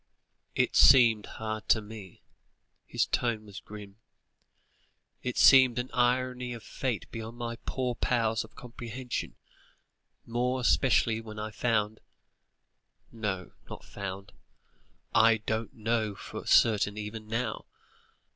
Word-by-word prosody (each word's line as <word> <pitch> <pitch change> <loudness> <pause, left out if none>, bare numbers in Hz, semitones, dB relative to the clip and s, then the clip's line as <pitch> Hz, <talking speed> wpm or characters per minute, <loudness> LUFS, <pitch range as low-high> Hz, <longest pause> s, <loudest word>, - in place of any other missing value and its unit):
"It - - +1
seemed 115 -5 +6
hard 110 -1 -5
to 110 - +5
me," 105 -4 -11 0.6
his - - +1
tone 115 -3 -1
was 100 -1 -9
grim; 105 -1 -11 1.2
"it 125 -1 -4
seemed 130 -3 +7
an 125 +1 -3
irony 125 0 0
of 115 - -9
fate 125 -6 -3
beyond 115 0 -7
my 115 -1 -4
poor 125 -2 -1
powers 115 -2 0
of - - -16
comprehension, 120 +1 -6 0.9
more 125 +2 -1
especially 115 -2 +2
when 110 -1 -10
I 110 0 -4
found 110 -1 0 1.1
no, 105 -5 -4 0.2
not - - -9
found 100 0 -7 0.8
I 115 0 +5
don't 110 +1 -3
know 110 -2 -1
for - - -8
certain 105 -2 +4
even 105 +1 -6
now. 115 +3 -3
115 Hz, 120 wpm, -29 LUFS, 105-120 Hz, 1.2 s, seemed